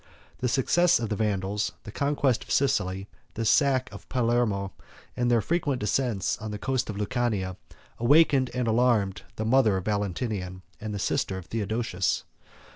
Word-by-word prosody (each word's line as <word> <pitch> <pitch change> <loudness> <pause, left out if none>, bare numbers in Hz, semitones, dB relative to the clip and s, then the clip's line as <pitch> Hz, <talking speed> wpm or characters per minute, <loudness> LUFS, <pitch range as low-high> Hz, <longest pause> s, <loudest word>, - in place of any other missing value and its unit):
The 125 - 0
success 140 +7 +3
of 115 -3 -3
the 105 - -1
Vandals, 105 -1 -1
the 110 - -8
conquest 140 -1 +1
of - - -20
Sicily, 100 -9 +1 0.3
the 115 - -2
sack 135 +1 +3
of 100 - -12
Palermo, 115 -6 +1 0.4
and 120 0 +1
the 120 -2 +4
frequent 150 - 0
descents 105 -2 0
on 110 0 -5
the 105 - -4
coast 130 +2 -1
of 105 - -3
Lucania, 105 -4 -1 0.4
awakened 135 +1 +4
and 125 -2 0
alarmed 110 -4 +2
the 110 - -3
mother 115 -4 +4
of 95 - -5
Valentinian, 100 -2 -2 0.2
and 110 0 -5
the 100 - -3
sister 95 0 -1
of 95 - -8
Theodosius. 110 -3 -1
110 Hz, 160 wpm, -27 LUFS, 100-125 Hz, 0.4 s, the